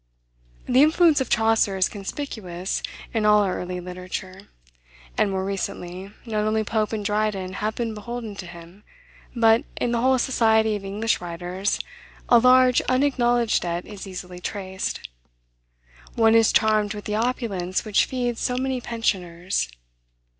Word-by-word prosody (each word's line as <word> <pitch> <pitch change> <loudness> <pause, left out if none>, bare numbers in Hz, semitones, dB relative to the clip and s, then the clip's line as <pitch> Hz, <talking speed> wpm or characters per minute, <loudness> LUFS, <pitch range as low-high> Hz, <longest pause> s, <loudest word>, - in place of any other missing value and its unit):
The 255 +2 +4
influence 315 -1 +5
of 265 - -2
Chaucer 220 -3 +2
is 185 - +3
conspicuous 195 -4 -5 0.3
in 225 -2 0
all 210 0 +5
our 190 -2 -1
early 180 0 -4
literature; 185 +2 -7 0.7
and, 205 - +2
more 190 -1 -2
recently, 195 -1 -5
not 215 -2 -1
only 220 0 +1
Pope 215 0 -1
and 215 -2 -3
Dryden 205 -3 -1
have 215 +2 -2
been 230 -2 -2
beholden 225 0 -6
to 185 - -7
him, 170 +3 -13 0.5
but, 225 -1 +4
in 240 - 0
the 235 -1 0
whole 260 +1 +4
society 220 -4 +2
of 205 - -6
English 210 +3 -1
writers, 180 +3 -2 0.5
a 240 - +7
large 255 +1 +5
unacknowledged 245 -3 +2
debt 175 0 -3
is 200 -1 -9
easily 180 -1 -8
traced. 190 - -4 1.1
One 225 -1 +4
is 225 -1 +5
charmed 215 -1 +2
with 205 - -8
the 210 - -3
opulence 215 -5 -1
which 210 -2 +3
feeds 245 -2 -2
so 250 - 0
many 260 -1 -1
pensioners. 185 - -1
210 Hz, 145 wpm, -24 LUFS, 190-235 Hz, 1.1 s, a